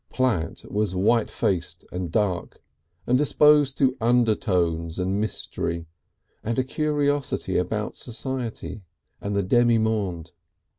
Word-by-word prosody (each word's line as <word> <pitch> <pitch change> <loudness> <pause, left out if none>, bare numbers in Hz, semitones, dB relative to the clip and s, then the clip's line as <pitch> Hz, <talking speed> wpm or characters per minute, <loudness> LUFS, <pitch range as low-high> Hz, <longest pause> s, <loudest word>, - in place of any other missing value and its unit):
Platt 105 -11 -1
was 105 -3 -1
white 110 +4 +2
faced 90 -4 -2
and 90 -2 -4
dark, 95 -3 -1 0.4
and 125 +1 +3
disposed 150 -1 +4
to 130 -2 +3
undertones 90 -9 +1
and 95 +2 0
mystery 85 -5 -3 0.6
and 115 +3 -2
a 130 - +3
curiosity 145 - -1
about 105 +4 -1
society 120 -2 -5 0.4
and 100 0 -3
the 100 - +1
demi 120 +4 +4
monde. 100 -7 -1
110 Hz, 115 wpm, -25 LUFS, 90-125 Hz, 0.6 s, disposed